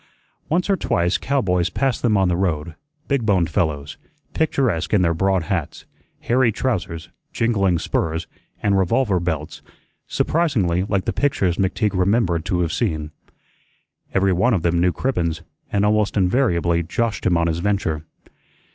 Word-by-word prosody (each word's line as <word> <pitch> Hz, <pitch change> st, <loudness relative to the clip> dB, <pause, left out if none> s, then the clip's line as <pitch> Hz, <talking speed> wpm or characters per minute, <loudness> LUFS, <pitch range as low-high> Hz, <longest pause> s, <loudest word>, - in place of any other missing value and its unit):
Once 175 Hz, +3 st, +1 dB
or 200 Hz, -, +3 dB
twice 90 Hz, -, 0 dB
cowboys 90 Hz, -11 st, 0 dB
passed 135 Hz, +5 st, -1 dB
them 110 Hz, -4 st, +2 dB
on 95 Hz, -1 st, +3 dB
the 90 Hz, -, +1 dB
road, 85 Hz, -3 st, -1 dB, 0.3 s
big 140 Hz, -4 st, 0 dB
boned 95 Hz, -6 st, +1 dB
fellows, 75 Hz, -3 st, -1 dB, 0.4 s
picturesque 125 Hz, -, 0 dB
in 95 Hz, -, +3 dB
their 85 Hz, -1 st, +2 dB
broad 95 Hz, +1 st, +1 dB
hats, 85 Hz, -3 st, -3 dB, 0.4 s
hairy 120 Hz, -1 st, +2 dB
trousers, 95 Hz, -8 st, -3 dB, 0.2 s
jingling 100 Hz, -6 st, +1 dB
spurs, 80 Hz, +1 st, -2 dB, 0.4 s
and 100 Hz, -1 st, +2 dB
revolver 95 Hz, +1 st, +1 dB
belts, 80 Hz, -3 st, -4 dB, 0.5 s
surprisingly 115 Hz, -, +1 dB
like 100 Hz, -2 st, -1 dB
the -, -, -1 dB
pictures 95 Hz, -11 st, 0 dB
McTeague 100 Hz, +2 st, 0 dB
remembered 90 Hz, -3 st, +1 dB
to 90 Hz, -1 st, 0 dB
have 85 Hz, -2 st, -1 dB
seen. 75 Hz, 0 st, -2 dB, 1.0 s
Everyone 95 Hz, +5 st, +2 dB
of 85 Hz, -, -2 dB
them 85 Hz, 0 st, +1 dB
knew 90 Hz, 0 st, +3 dB
Cribbens, 85 Hz, -9 st, -2 dB, 0.3 s
and 100 Hz, 0 st, +2 dB
almost 105 Hz, -1 st, +1 dB
invariably 90 Hz, -5 st, +2 dB
joshed 110 Hz, +7 st, -2 dB
him 85 Hz, -, +3 dB
on 85 Hz, -, +1 dB
his 85 Hz, 0 st, -1 dB
venture. 85 Hz, -5 st, -1 dB
95 Hz, 145 wpm, -21 LUFS, 85-110 Hz, 1.0 s, or